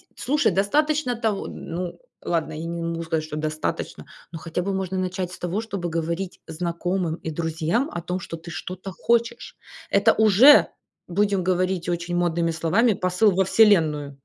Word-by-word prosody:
слушай, 290 -3 +1
достаточно 270 - +1
того 220 -4 -2
Ну 175 +1 -6 0.2
ладно, 165 -2 -1
я 155 +2 -5
не 170 0 -4
могу 165 0 -3
сказать, 160 -1 -1
что 155 -1 -7
достаточно. 155 0 -3 0.3
Ну, 165 - -6
хотя 165 +2 -3
бы 195 +2 -2
можно 190 -1 -2
начать 185 -1 -2
с - - -10
того, 180 +5 -2
чтобы 200 -6 -4
говорить 170 +3 -3
знакомым 170 +1 -2
и 160 - -7
друзьям 165 - -1
о 175 - -4
том, 180 +2 -3
что 165 -2 -7
ты 170 +1 -10
что-то 185 +3 -6
хочешь. 235 +4 -1 0.3
Это 205 +3 +4
уже, 220 +7 +7 0.4
будем 200 +1 +1
говорить 185 0 0
очень 175 0 -2
модными 170 -1 +1
словами, 175 +9 +2
посыл 185 +3 +2
во 190 +1 +2
Вселенную. 155 -10 +3
180 Hz, 165 wpm, -24 LUFS, 165-200 Hz, 0.4 s, уже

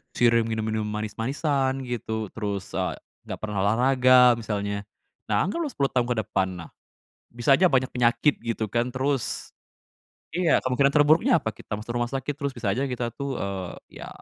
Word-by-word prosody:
sering 115 -1 +3
minum-minum 110 -1 -2
manis-manisan 130 +6 -1
gitu 110 -4 -4
terus, 100 -3 -4
eee, - - -2 0.3
gak - - -5
pernah 105 -2 -3
olahraga 125 +2 +5
misalnya, 100 -2 -3 0.4
nah 105 -1 +2
anggaplah 305 - -2
10 140 - -1
tahun 125 -2 +1
ke 125 - 0
depan 95 -1 0
nah, 85 - -11 0.6
bisa 120 +4 +3
aja 185 - +4
banyak 130 -3 +2
penyakit 120 +4 +2
gitu 115 -1 -2
kan 120 +1 0
terus, 135 -1 -2 0.8
iya 175 -1 +3
kemungkinan 140 +2 +2
terburuknya 150 +2 +4
apa 110 - -2
kita 100 - -9
masuk 110 +2 -6
rumah 120 0 -1
sakit 135 +2 -3
terus 140 -2 -3
bisa 115 -5 -1
aja 135 +5 -1
kita 120 -2 -3
tuh, 140 +2 -4
eee, 95 -2 -6
ya - - -7
120 Hz, 165 wpm, -25 LUFS, 110-135 Hz, 0.8 s, olahraga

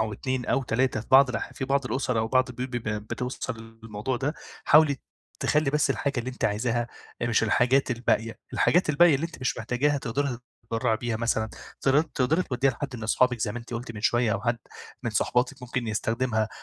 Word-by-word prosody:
أو 110 -1 0
2 130 +3 -3
أو 135 - +1
3 125 0 0
في - - -11
بعض 135 0 +8
الأح 125 - -4
في - - -4
بعض 140 +1 +1
الأُسَر 125 -1 -1
أو 110 - 0
بعض 130 +2 +3
البيوت 125 +1 -5
بيبقى 110 -4 -3
بتوصل 115 0 -5
للموضوع 115 +3 -3
ده، 135 +5 -2 0.3
حاولي 150 -2 +6 0.4
تخلّي 150 -1 +2
بس 150 -1 +2
الحاجة 135 +2 -1
اللي 125 +2 -3
أنتِ 125 - -5
عايزاها، 115 +3 0 0.4
آآ، - - +1
مش 115 -1 +2
الحاجات 125 +5 +3
الباقية، 115 -2 0
الحاجات 175 -2 +3
الباقية 160 +2 +6
اللي 145 +4 0
أنتِ 170 - -13
مش 130 +3 -1
محتاجاها 130 +6 +1
تقدري 130 +1 -2 0.3
تتبرّعي 115 0 0
بيها 120 -1 -2
مثلًا 110 -1 0 0.7
تقدري 155 +8 +2
توديها 135 -2 +1
لحد 135 +1 -5
من 110 - -8
أصحابِك 125 +2 +2
زي 105 -2 0
ما 120 - -4
أنتِ 120 0 -8
قُلتِ 115 0 -5
من 110 - -8
شوية 120 0 +2
أو 100 - -1
حد 120 -1 0 0.4
من - - -1
صاحباتِك 125 +2 0
ممكن 125 -1 -3
يستخدمها، 110 0 0
125 Hz, 200 wpm, -26 LUFS, 115-135 Hz, 0.7 s, بعض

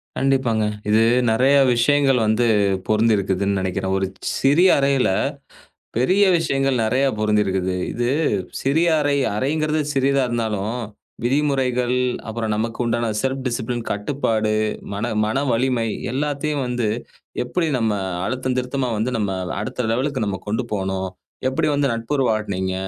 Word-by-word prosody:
கண்டிப்பாங்க. 130 -5 +1 0.2
இது 110 +1 +4 0.3
நெறைய 130 +5 +4 0.2
விஷயங்கள் 135 +2 +3
வந்து 110 +3 +2 0.4
பொருந்தியிருக்குதுன்னு 100 -3 +1
நெனைக்கிறேன். 95 +1 -1
ஒரு 95 0 0 0.3
சிறிய 155 +8 +5
அறையில 140 -4 +2 0.9
பெரிய 185 +12 +3
விஷயங்கள் 135 -4 0
நெறைய 125 +5 +2
பொருந்தியிருக்குது. 95 -4 +1 0.2
இது 120 0 -1 0.5
சிறிய 160 +6 +2
அறை. 145 -1 +1 0.2
அறைங்கறது 155 +5 0
சிறியதா 135 0 +2
இருந்தாலும் 110 -2 -2 0.5
விதிமுறைகள், 130 -2 +1 0.3
அப்புறம் 110 -1 -2
நமக்குண்டான 115 +1 -1 0.2
செல்ஃப் 135 0 -1
டிசிப்ளின் 120 -1 -2
கட்டுப்பாடு, 110 -1 -1 0.4
மன 100 - -2 0.2
மன 130 +6 0
வலிமை 120 0 +1 0.3
எல்லாத்தையும் 145 +1 -1
வந்து 120 -3 -1 0.6
எப்டி 165 +7 -1
நம்ம 110 -3 +1 0.3
அழுத்தம் 130 +1 -2
திருத்தமா 125 0 -1
வந்து 115 +4 -1
நம்ம 105 -3 -1 0.3
அடுத்த 110 +3 -3
லெவல்க்கு 130 0 -1
நம்ம 100 -2 -2
கொண்டு 110 +5 -1
போனோம், 95 -1 -2 0.4
எப்டி 130 - 0
வந்து 140 -1 +1
நட்பு 115 +5 -4
உறவுவாட் 110 -6 0
நீங்க, 95 0 -2
120 Hz, 125 wpm, -21 LUFS, 110-135 Hz, 0.9 s, சிறிய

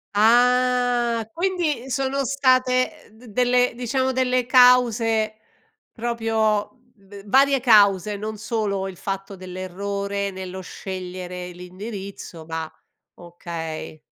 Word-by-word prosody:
Ah, 245 0 +3
quindi 335 -8 -1
sono 270 +1 -1
state 255 -1 +1
d 225 +3 -18
delle 245 +2 +2
diciamo, 260 +2 -1
delle 255 -1 +1
cause 235 -4 +4 0.6
proprio 225 -3 -1 0.3
v 195 0 -13
varie 270 +3 +4
cause, 205 -4 +4
non 215 +1 -5
solo 205 -3 -2
il 185 - -11
fatto 195 +1 -5
dell'errore 200 +2 -4
nello 190 0 -7
scegliere 180 -1 -7
l'indirizzo 185 -1 -8
ma 160 0 -4 0.5
okay. 170 -2 -7
220 Hz, 100 wpm, -23 LUFS, 190-250 Hz, 0.6 s, cause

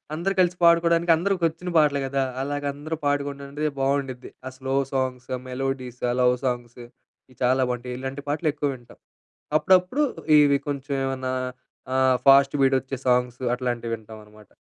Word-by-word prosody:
అందరూ 190 +4 -1
కలిసి 180 0 +3
పాడుకోడానికి, 170 0 +4
అందరికి 185 0 -1
వచ్చిన 175 +3 -8
పాటలు 145 -2 +3
గదా! 135 0 0 0.2
అలాగ 145 +1 -3
అందరూ 155 +3 -5
పాడుకుంటే 145 +1 -2
బావుండుద్ది. 135 -2 -2 0.2
ఆ - - -6
స్లో 135 0 -3 0.2
సాంగ్స్, 130 -1 -2 0.2
మెలోడీస్ 130 -1 -4
ఆ - - 0
లవ్ 125 0 +4
సాంగ్స్ 120 -1 -3
ఇవి 125 +1 -26
చాలా 130 +1 +3
బావుంటాయి. 125 0 -5
ఇలాంటి 135 +2 -5
పాటలు 155 +2 0
ఎక్కువ 145 -1 -1
వింటాం. 120 -1 -17 0.6
అప్పుడప్పుడు 185 - +3 0.4
ఇవి 140 -1 +5
కొంచెం 140 0 -3
ఏమన్నా 130 -1 -2 0.6
ఆహ్, 130 -1 +4
ఫాస్ట్ 135 +1 +6
బీట్ 135 0 +4
వచ్చే 135 +1 -6
సాంగ్స్ 125 -1 +2 0.2
అట్లాంటివింటాం 115 -3 -4
అనమాట. 105 -1 -18
135 Hz, 150 wpm, -24 LUFS, 125-150 Hz, 0.6 s, ఫాస్ట్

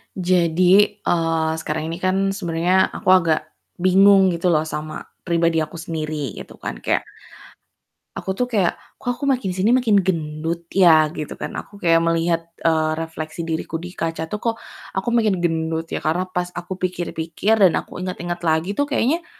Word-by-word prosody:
Jadi, 180 -2 +2 0.4
eee, 165 -2 +1
sekarang 155 +1 -3
ini 165 - -5
kan 190 +1 +1
sebenernya 180 -1 +1
aku - - -4
agak 165 -4 +4 0.4
bingung 190 +1 +5
gitu 170 +1 -1
loh 155 -3 +3
sama 155 0 -5 0.2
pribadi 170 -1 +2
aku 155 +1 -4
sendiri 155 -5 -4
gitu - - -11
kan, - - -6
kayak - - 0 1.1
aku - - -6
tuh 250 - +1
kayak, 210 -8 0 0.2
"Kok - - -3
aku - - -11
makin 255 -7 +1
sini 190 +6 +2
makin 240 -5 +3
gendut 165 -1 -2
ya?" 160 -5 +5
Gitu 155 -1 -6
kan. - - -4
Aku 200 0 -9
kayak 165 -1 +4
melihat, 165 0 +1 0.2
eee, 160 -1 +2
refleksi 160 0 -6
diriku 165 0 -3
di 180 +1 -9
kaca 165 -1 -3
tuh 210 - -3
kok 225 +2 -1 0.4
aku 190 +4 -2
makin 220 -6 +2
gendut 165 -1 -1
ya, - - -2
karena 165 +4 +1
pas 180 -1 -3
aku 175 +1 -6
pikir-pikir, 180 +2 -1
dan 175 - +4
aku - - -12
inget-inget 175 -1 -4
lagi 160 +5 0
tuh 285 - +2
kayaknya 285 +4 0
170 Hz, 165 wpm, -21 LUFS, 160-190 Hz, 1.1 s, bingung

